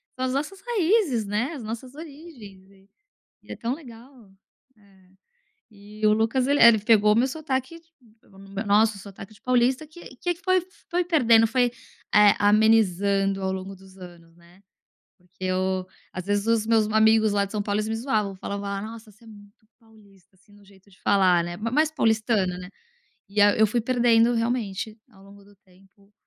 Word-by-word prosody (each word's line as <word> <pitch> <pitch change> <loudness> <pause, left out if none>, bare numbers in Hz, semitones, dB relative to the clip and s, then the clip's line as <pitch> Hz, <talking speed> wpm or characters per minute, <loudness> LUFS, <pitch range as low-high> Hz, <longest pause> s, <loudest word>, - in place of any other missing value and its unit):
são 260 - -3
as 255 - -2
nossas 345 +8 -4
raízes, 390 - 0
né, 215 +9 -2
as 275 -6 -8
nossas 230 +4 -7
origens 280 - -13
e 195 0 -24 0.5
e - - -14
é - - -8
tão 235 +2 -3
legal, 250 -4 -14
né. 195 - -25 1.4
E 210 +1 -7
o 210 - +5
Lucas 225 +4 0
ele 285 +2 +1
é, - - +9
ele 230 -2 +6
pegou 210 0 +3
meu 240 +4 +2
sotaque 275 +1 -4 0.4
pegou 195 - -22
no 195 0 -14
meu 200 +2 -5
nosso 210 0 +2
sotaque 200 +1 -12
de 205 - -22
paulista 255 +4 +1
que 315 -3 -14
que 350 +5 -2
que 345 - -22
foi 370 -1 +2 0.3
foi 355 +1 0
perdendo, 230 -10 +4
foi, 245 +1 +1 0.4
eh, 210 0 +6
amenizando 200 -2 +2
ao 190 0 -2
longo 190 +1 -6
dos 190 0 -18
anos, 170 -2 -14
né. 175 +2 -22 0.6
Porque 180 +1 -13
eu, 185 0 -1 0.3
às 185 0 -7
vezes 205 +1 -1
os 230 -1 +1
meus 225 -2 +2
amigos 220 0 +3
lá 200 -1 +1
de 200 - -10
São 210 -2 -2
Paulo 205 0 -2
eles 215 0 -2
me 220 - -2
zoavam, 215 -5 -2
falavam: 200 +1 -6 0.2
"Nossa 225 0 -10
você 230 +3 -23
é - - -18
muito 205 -1 -17 0.2
paulista" 200 -4 -23
assim, 195 +2 -27
no 205 0 -20
jeito 195 0 -22
de 195 - -23
falar, 185 -3 +3
né, 175 0 -6
mas 225 +4 -4
mais 310 +1 +2
paulistano, 220 - 0
né. 180 - -9 0.6
E 205 +1 -1
a 205 0 +5
eu 220 - +4
fui 235 +3 -1
perdendo 240 -1 +2
realmente, 230 -2 -3
ao 195 -3 -20
longo 200 0 -17
do 205 +1 -21
tempo, 195 +1 -26
215 Hz, 190 wpm, -24 LUFS, 195-240 Hz, 1.4 s, é